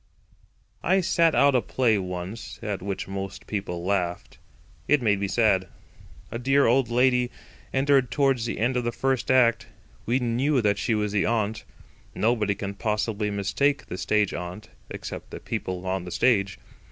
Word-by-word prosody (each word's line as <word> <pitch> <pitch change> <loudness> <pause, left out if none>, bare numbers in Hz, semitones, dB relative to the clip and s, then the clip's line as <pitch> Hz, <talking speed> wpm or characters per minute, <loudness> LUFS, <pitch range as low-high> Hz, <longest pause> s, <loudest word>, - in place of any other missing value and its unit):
I 190 +2 +3
sat 170 -2 +3
out 140 0 +5
a 125 - +3
play 115 -5 +1
once 90 +4 -6
at 100 -3 -3
which 100 0 -4
most 95 -1 -6
people 90 -4 -4
laughed. 90 -3 -2 0.5
It 150 - +4
made 105 -5 +1
me 100 - -1
sad. 95 -3 +2 0.6
A 115 - -4
dear 135 +3 +3
old 120 +1 +3
lady 125 0 +3 0.4
entered 135 -2 +3
towards 135 -5 +1
the - - -3
end 120 +4 +1
of 125 - 0
the 120 - -1
first 130 +1 -1
act. 125 -3 +4 0.4
We 120 +3 +2
knew 130 +3 +1 0.2
she 110 +3 0
was 105 -1 -1
the 100 -1 +1
aunt. 110 -1 -1 0.5
Nobody 110 -2 +1
can 100 0 -5
possibly 105 0 -1
mistake 105 +8 0
the 90 - -6
stage 105 -2 +1
aunt—except 90 +5 -8
the - - -7
people 90 0 -4
on 95 -1 -2
the 90 - -7
stage. 100 -5 +2
110 Hz, 160 wpm, -25 LUFS, 100-125 Hz, 0.6 s, out